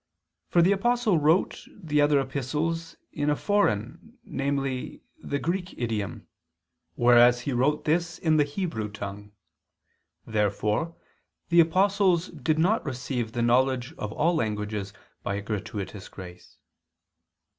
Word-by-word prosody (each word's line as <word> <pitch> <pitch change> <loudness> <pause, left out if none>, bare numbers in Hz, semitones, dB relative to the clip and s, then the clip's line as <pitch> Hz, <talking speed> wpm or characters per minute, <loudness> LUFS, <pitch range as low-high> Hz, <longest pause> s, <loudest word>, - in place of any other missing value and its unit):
For 170 - +4
the 185 - +4
Apostle 220 -2 +2
wrote 155 +5 +2
the 150 -6 -1
other 145 -1 +4
epistles 150 +5 -2 0.2
in 145 -1 -1
a 150 - +3
foreign, 205 - -1
namely 135 -2 -3 0.2
the 140 - -2
Greek, 180 +4 -3
idiom; 110 -5 -3 0.7
whereas 120 0 +5
he 140 - -3
wrote 140 +5 +1
this 170 +2 0
in 160 -2 +2
the 150 - +5
Hebrew 145 - -3
tongue." 105 0 -7 0.9
Therefore 105 - 0 0.5
the 170 -1 +5
apostles 185 +1 +3
did 155 0 -1
not 190 +8 +2
receive 125 -4 -3
the 120 - 0
knowledge 130 +3 +2
of 105 - -4
all 165 +8 +2
languages 105 - -2 0.3
by 100 - -2
a 100 - -3
gratuitous 105 -2 -5
grace. 90 -2 -12
140 Hz, 125 wpm, -26 LUFS, 110-165 Hz, 0.9 s, whereas